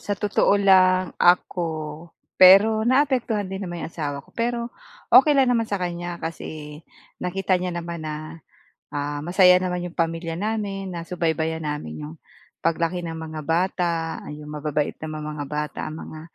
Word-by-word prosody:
sa 205 Hz, -, -3 dB
totoo 205 Hz, 0 st, +2 dB
lang 185 Hz, -2 st, +4 dB
ako. 165 Hz, -2 st, +1 dB, 0.3 s
Pero 215 Hz, +4 st, +7 dB
naapektuhan 255 Hz, -5 st, +2 dB
din 190 Hz, +1 st, -4 dB
naman 175 Hz, -1 st, -6 dB
'yong -, -, -6 dB
asawa 145 Hz, -4 st, -4 dB
ko -, -, -24 dB
pero 235 Hz, 0 st, -2 dB, 0.4 s
okey 300 Hz, -2 st, +7 dB
lang 265 Hz, -2 st, +4 dB
naman 230 Hz, -2 st, +1 dB
sa 205 Hz, -, -3 dB
kanya 175 Hz, -2 st, -4 dB
kasi 155 Hz, -2 st, -7 dB, 0.4 s
nakita 185 Hz, 0 st, 0 dB
niya 180 Hz, -1 st, -3 dB
naman 170 Hz, -1 st, -5 dB
na, 155 Hz, +1 st, -6 dB, 0.5 s
ah, 145 Hz, +1 st, -3 dB
masaya 180 Hz, +1 st, +6 dB
naman 180 Hz, -1 st, -2 dB
'yong 170 Hz, -, -16 dB
pamilya 165 Hz, 0 st, -1 dB
namin, 200 Hz, -2 st, -3 dB
nasubaybayan 160 Hz, -2 st, -2 dB
namin 80 Hz, -, -5 dB
'yong 80 Hz, +2 st, -9 dB, 0.5 s
paglaki 165 Hz, +2 st, 0 dB
ng 165 Hz, -1 st, -5 dB
mga 160 Hz, -1 st, -6 dB
bata, 175 Hz, +2 st, 0 dB, 0.4 s
'yong 150 Hz, 0 st, -8 dB
mababait 150 Hz, 0 st, -2 dB
na 155 Hz, 0 st, -5 dB
mga 150 Hz, -1 st, -5 dB
bata 150 Hz, -1 st, -4 dB
ang 155 Hz, -, -7 dB
mga, 155 Hz, -, -9 dB
170 Hz, 155 wpm, -23 LUFS, 155-190 Hz, 0.5 s, Pero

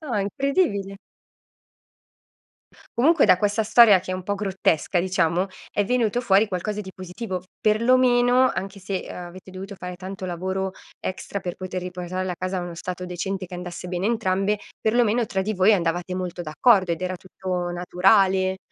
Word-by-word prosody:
No 285 Hz, -7 st, -4 dB
è 205 Hz, -, +1 dB
incredibile. 200 Hz, -, 0 dB, 2.0 s
Comunque 320 Hz, +7 st, +5 dB
da 180 Hz, -, +5 dB
questa 210 Hz, +2 st, +1 dB
storia 215 Hz, -3 st, +7 dB
che 185 Hz, -, -8 dB
è -, -, -1 dB
un 185 Hz, -, -5 dB
po' 200 Hz, +3 st, -2 dB
grottesca, 190 Hz, -3 st, 0 dB
diciamo, 180 Hz, 0 st, +1 dB, 0.3 s
è 205 Hz, -, +2 dB
venuto 240 Hz, +1 st, +1 dB
fuori 210 Hz, -2 st, +4 dB
qualcosa 205 Hz, +2 st, -3 dB
di 190 Hz, -, -9 dB
positivo, 185 Hz, 0 st, -5 dB, 0.2 s
perlomeno 245 Hz, +3 st, +4 dB
anche 195 Hz, +1 st, -5 dB
se 190 Hz, 0 st, -4 dB
avete 180 Hz, +1 st, -9 dB
dovuto 195 Hz, +2 st, -8 dB
fare 180 Hz, -1 st, -7 dB
tanto 185 Hz, +1 st, -7 dB
lavoro 190 Hz, +2 st, -3 dB, 0.3 s
extra, 190 Hz, +1 st, -4 dB
per 180 Hz, -1 st, -4 dB
poter 185 Hz, 0 st, -5 dB
riportare 180 Hz, +1 st, -4 dB
la 180 Hz, -, -2 dB
casa 185 Hz, +2 st, -2 dB
a -, -, -2 dB
uno 175 Hz, -1 st, -6 dB
stato 180 Hz, +1 st, -5 dB
decente 185 Hz, +2 st, -4 dB
che 180 Hz, -, -9 dB
andasse 180 Hz, 0 st, -7 dB
bene 180 Hz, +1 st, -3 dB
a -, -, +2 dB
entrambe, 205 Hz, -2 st, 0 dB, 0.2 s
perlomeno 235 Hz, +1 st, +2 dB
tra 190 Hz, -2 st, -2 dB
di 215 Hz, +3 st, -1 dB
voi 190 Hz, +3 st, +5 dB
andavate 175 Hz, -1 st, 0 dB
molto 180 Hz, -1 st, -4 dB
d'accordo 185 Hz, +3 st, +3 dB
ed 165 Hz, -, -4 dB
era 185 Hz, 0 st, -2 dB
tutto 180 Hz, -1 st, -4 dB
naturale. 185 Hz, +2 st, +3 dB
190 Hz, 170 wpm, -24 LUFS, 180-210 Hz, 2.0 s, storia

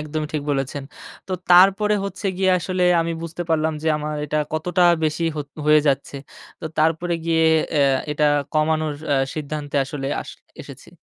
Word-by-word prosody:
একদমই 155 Hz, 0 st, -4 dB
ঠিক 150 Hz, -2 st, -2 dB
বলেছেন। 140 Hz, 0 st, -2 dB, 0.5 s
তো -, -, -3 dB, 0.2 s
তারপরে 195 Hz, +4 st, +6 dB
হচ্ছে 200 Hz, +1 st, -5 dB
গিয়ে, 190 Hz, 0 st, +2 dB
আসলে 185 Hz, +1 st, -2 dB, 0.2 s
আমি 165 Hz, 0 st, -2 dB
বুঝতে 165 Hz, +1 st, -5 dB
পারলাম 160 Hz, 0 st, +1 dB
যে, -, -, -4 dB
আমার 150 Hz, 0 st, -4 dB
এটা 150 Hz, +1 st, -3 dB, 0.2 s
কতটা 175 Hz, +3 st, 0 dB, 0.2 s
বেশি 155 Hz, +2 st, -1 dB
হো -, -, -2 dB, 0.3 s
হয়ে 150 Hz, 0 st, +6 dB
যাচ্ছে। 140 Hz, 0 st, -1 dB, 0.4 s
তো -, -, -8 dB
তারপরে 165 Hz, +3 st, +1 dB
গিয়ে 165 Hz, -1 st, +2 dB, 0.3 s
অ্যা 150 Hz, -, +2 dB, 0.3 s
এটা 150 Hz, 0 st, 0 dB, 0.3 s
কমানোর 155 Hz, -1 st, 0 dB, 0.2 s
আ -, -, +3 dB, 0.2 s
সিদ্ধান্তে 150 Hz, -1 st, -5 dB
আসলে 135 Hz, 0 st, -5 dB, 0.2 s
আস -, -, -10 dB, 0.3 s
এসেছি। -, -, -12 dB
155 Hz, 165 wpm, -21 LUFS, 150-170 Hz, 0.5 s, তারপরে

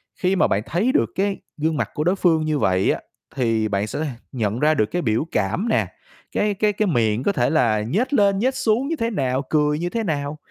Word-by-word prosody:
khi 185 Hz, +1 st, 0 dB
mà -, -, +3 dB
bạn 100 Hz, -, 0 dB
thấy 200 Hz, +10 st, +1 dB
được -, -, +2 dB
cái 195 Hz, 0 st, 0 dB, 0.2 s
gương 155 Hz, +1 st, 0 dB
mặt -, -, -1 dB
của 150 Hz, -, -2 dB
đối 180 Hz, +3 st, +2 dB
phương 165 Hz, -4 st, +2 dB
như 155 Hz, -2 st, 0 dB
vậy 95 Hz, 0 st, +2 dB
á, -, -, -2 dB, 0.4 s
thì 115 Hz, -4 st, +1 dB
bạn 100 Hz, +1 st, -1 dB
sẽ -, -, -4 dB
th 155 Hz, -, -1 dB, 0.3 s
nhận 115 Hz, -2 st, -2 dB
ra 155 Hz, +1 st, +4 dB
được 110 Hz, -, +2 dB
cái 175 Hz, -, -1 dB
biểu 115 Hz, +3 st, 0 dB
cảm 105 Hz, -, -1 dB
nè, -, -, +2 dB, 0.4 s
cái 205 Hz, 0 st, +1 dB
cái 210 Hz, +1 st, +1 dB
cái 210 Hz, 0 st, 0 dB
miệng 115 Hz, -5 st, +1 dB
có 200 Hz, -, +2 dB
thể -, -, +1 dB
là 115 Hz, -9 st, +2 dB
nhếch 205 Hz, -, -1 dB
lên, 200 Hz, -6 st, +3 dB
nhếch 260 Hz, +4 st, +1 dB
xuống 260 Hz, 0 st, +1 dB
như 330 Hz, -, -1 dB
thế 230 Hz, -4 st, -1 dB
nào, 130 Hz, -, -1 dB
cười 150 Hz, 0 st, +2 dB
như 175 Hz, -, -2 dB
thế 225 Hz, +4 st, -2 dB
nào. 145 Hz, -3 st, -2 dB
155 Hz, 245 wpm, -22 LUFS, 120-200 Hz, 0.4 s, ra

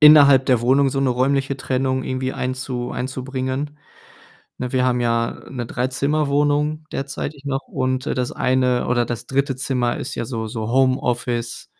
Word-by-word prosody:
innerhalb 145 Hz, -3 st, +8 dB
der 125 Hz, -3 st, +3 dB
Wohnung 135 Hz, +3 st, +4 dB
so 135 Hz, -, -1 dB
'ne 135 Hz, -, +2 dB
räumliche 135 Hz, +2 st, +1 dB
Trennung 130 Hz, 0 st, -1 dB
irgendwie 130 Hz, 0 st, -2 dB
einzu 125 Hz, -1 st, -3 dB
einzubringen. 130 Hz, +3 st, -3 dB, 0.8 s
Ne, 125 Hz, 0 st, -4 dB
wir 130 Hz, -1 st, +2 dB
haben 125 Hz, -1 st, +2 dB
ja 115 Hz, -1 st, 0 dB
'ne 125 Hz, -3 st, -4 dB
Dreizimmerwohnung 145 Hz, +4 st, 0 dB
derzeitig 140 Hz, +1 st, -5 dB
noch 135 Hz, -1 st, -1 dB
und, 130 Hz, 0 st, -1 dB
äh, -, -, 0 dB
das 125 Hz, -1 st, -1 dB
eine 130 Hz, -1 st, +1 dB
oder 120 Hz, -1 st, +2 dB
das 120 Hz, -1 st, -5 dB
3. 135 Hz, -1 st, 0 dB
Zimmer 130 Hz, -3 st, 0 dB
ist 135 Hz, -, -4 dB
ja -, -, -3 dB
so 115 Hz, -2 st, -4 dB
so 110 Hz, 0 st, -4 dB
Homeoffice 125 Hz, -2 st, 0 dB
130 Hz, 160 wpm, -21 LUFS, 125-140 Hz, 0.8 s, innerhalb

